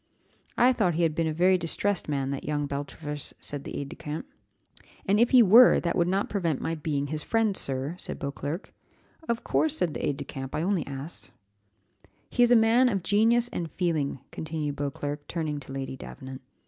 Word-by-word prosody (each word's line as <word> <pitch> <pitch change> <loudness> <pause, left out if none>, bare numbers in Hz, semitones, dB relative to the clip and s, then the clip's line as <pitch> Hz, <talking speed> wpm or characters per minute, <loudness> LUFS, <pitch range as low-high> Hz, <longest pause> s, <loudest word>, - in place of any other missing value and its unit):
"I 250 +2 +5
thought 185 -9 +1
he 170 - +1
had 160 -2 +2
been 165 +1 0
a - - 0
very 180 +4 +3
distressed 175 +2 0
man, 135 -2 -1
that 140 - -4
young 145 -1 -1
Beltravers," 145 +1 -5
said 145 -1 -5
the - - -5
aid 140 -1 -4
de - - -8
camp. 150 - -5 0.8
"And 200 +2 +3
if 235 +1 +5
he 250 -2 +7
were, 230 +5 +8
that 170 - -1
would 170 - +2
not 195 +3 +1
prevent 170 -8 -1
my 165 - -2
being 150 -3 -2
his 155 +1 -3
friend, 225 +2 +1
sir," 135 +1 -2
said - - -5
Beauclerc. 145 +4 -5 0.6
"Of 235 0 -1
course," 315 -1 +1
said 170 - 0
the - - -5
aid 140 - 0
de 140 - -6
camp, 135 -1 -6
"I 155 - -1
only 185 -4 0
asked." 140 +4 -7 1.0
"He - - +1
is 240 - +6
a 245 - +7
man 230 +3 +5
of 195 -6 -1
genius 225 +5 +3
and 170 -2 -3
feeling," 160 -7 0
continued 155 -2 -4
Beauclerc, 145 +1 -4
turning 155 -3 -3
to 135 -1 -10
Lady 135 -1 -4
Davenant. 130 0 -9
160 Hz, 200 wpm, -27 LUFS, 145-200 Hz, 1.0 s, were